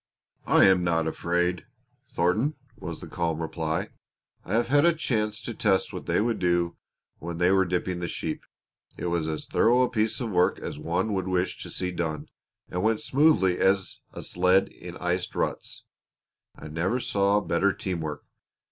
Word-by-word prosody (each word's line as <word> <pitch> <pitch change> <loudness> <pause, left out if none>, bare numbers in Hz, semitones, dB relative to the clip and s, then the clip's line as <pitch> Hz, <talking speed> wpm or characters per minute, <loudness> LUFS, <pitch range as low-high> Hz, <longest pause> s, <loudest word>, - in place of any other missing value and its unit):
"I - - +6
am 95 -2 +5
not 85 -2 +1
afraid, 90 +2 -1 0.5
Thornton," 110 - +1 0.2
was - - -7
the - - -8
calm 85 -2 -2
reply. 80 -1 -2 0.5
"I 95 - -5
have 120 - +2
had 145 +1 +5
a 170 -1 +4
chance 110 -8 -1
to 120 - -4
test 100 -3 +1
what - - -7
they - - +2
would 115 +2 0
do 85 -1 +1 0.4
when 85 +1 -5
they 90 +2 +3
were 95 0 +4
dipping 90 0 -2
the 85 - -3
sheep. 80 -2 -4 0.6
It - - -5
was 85 -2 0
as 80 -1 -3
thorough 125 +2 +3
a 125 - +1
piece 110 -2 0
of 120 -4 -3
work 90 -1 +3
as 70 - -6
one 90 +7 -1
would 95 -1 -1
wish 90 0 -1
to - - -7
see 90 -1 -3
done, 80 -4 -3 0.4
and 90 - -3
went 110 +1 +1
smoothly 135 - +3
as 95 0 +1
a - - -8
sled 90 +2 +2
in 90 0 -10
iced 90 +1 -2
ruts. - - -3 0.7
I - - -10
never 85 +10 -1
saw 100 -3 +2
better 100 0 +1
team 90 -2 -4
work. 75 -2 -5
90 Hz, 180 wpm, -26 LUFS, 85-105 Hz, 0.7 s, I